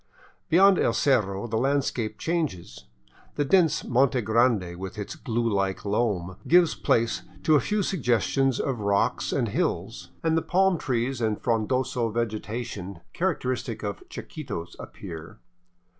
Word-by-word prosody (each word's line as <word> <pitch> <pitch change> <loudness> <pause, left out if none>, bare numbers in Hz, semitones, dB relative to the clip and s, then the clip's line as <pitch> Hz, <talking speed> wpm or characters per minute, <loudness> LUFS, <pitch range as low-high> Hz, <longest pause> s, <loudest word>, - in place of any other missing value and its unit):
Beyond 190 +3 +6
El 115 - +2
Cerro 105 -6 +1
the 110 -1 -1
landscape 125 -5 0
changes. 155 - -3 0.5
The 145 - 0
dense 165 0 +3
Monte 130 +1 +2
Grande 110 -5 +2
with 95 +3 -7
its 105 - -5
glue 115 0 -2
like 100 -3 -1
loam 100 -4 -1
gives 175 -3 +5
place 115 +3 +1 0.2
to 155 - +4
a 150 - +6
few 210 +5 0
suggestions 135 - +1
of 130 -4 -1
rocks 100 +4 +1
and 120 -5 0
hills, 115 - -2
and 160 -1 +2
the 165 - +2
palm 190 -1 +2
trees 125 0 -1
and 110 -2 0
frondoso 120 +1 0
vegetation 110 -4 -4
characteristic 125 - -2
of 100 -1 -3
Chi - - -7
quitos 85 - -7
appear. 80 -4 -9
120 Hz, 140 wpm, -26 LUFS, 105-140 Hz, 0.5 s, Beyond